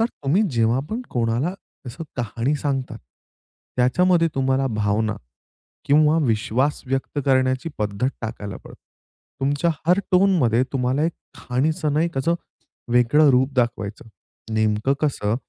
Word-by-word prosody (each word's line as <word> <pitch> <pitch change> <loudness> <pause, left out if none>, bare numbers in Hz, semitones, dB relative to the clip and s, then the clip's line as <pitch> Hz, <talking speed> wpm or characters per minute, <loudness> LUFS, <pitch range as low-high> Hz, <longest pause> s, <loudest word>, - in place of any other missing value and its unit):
तर 225 - +4
तुम्ही 155 - 0
जेव्हा 115 +1 +2
पण 225 - -2
कोणाला 120 +9 0 0.3
तसं 140 +7 -7
कहाणी 120 +4 -1
सांगतात. 135 -2 -3 0.8
त्याच्यामध्ये 165 +7 +3
तुम्हाला 135 0 +1
भावना 105 -1 0 0.7
किंवा 150 +2 +4
विश्वास 120 +5 0
व्यक्त 135 +2 -2
करण्याची 130 +2 +2
पद्धत 105 +4 -1
टाकायला 105 -4 -5
पडतं. - - -15 0.6
तुमच्या 145 +5 +1 0.2
हर 180 +3 +4
टोनमध्ये 175 - +4
तुम्हाला 130 +2 0
एक 170 - 0 0.3
खाणीचं 150 +5 -1
नाही 160 +3 +2
कसं 150 +6 +1 0.6
वेगळं 125 +5 +5
रूप 130 +2 +2
दाखवायचं, 115 -3 -2 0.5
नेमकं 110 +4 +1
कसं, 115 -8 0
130 Hz, 120 wpm, -22 LUFS, 115-150 Hz, 0.8 s, वेगळं